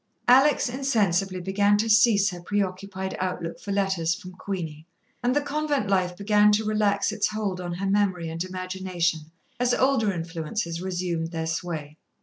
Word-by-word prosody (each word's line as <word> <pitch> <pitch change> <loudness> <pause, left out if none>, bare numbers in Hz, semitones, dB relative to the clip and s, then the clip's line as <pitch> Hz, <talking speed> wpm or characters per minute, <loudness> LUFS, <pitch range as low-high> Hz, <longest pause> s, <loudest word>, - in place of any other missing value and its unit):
Alex 270 +4 +5
insensibly 205 -8 0
began 200 +3 +2
to 220 +2 0
cease 215 -2 +5
her 175 -1 -8
preoccupied 190 0 -3
outlook 180 -2 -3
for 200 - -6
letters 190 -4 +1
from 185 -1 -10
Queenie, 170 -5 -6 0.3
and 250 +2 +1
the 290 - +3
convent 290 -4 -1
life 180 -2 +1
began 210 +1 +4
to 215 +1 +1
relax 210 -1 +1
its 215 -1 0
hold 205 -4 -3
on 175 -1 -4
her 195 +3 -3
memory 195 -4 +1
and 165 +1 -3
imagination, 185 -2 -2 0.4
as 245 0 +2
older 260 -6 +2
influences 170 +1 -4
resumed 175 -3 -2
their 165 -1 -3
sway. 160 -2 -4
190 Hz, 155 wpm, -25 LUFS, 175-210 Hz, 0.4 s, Alex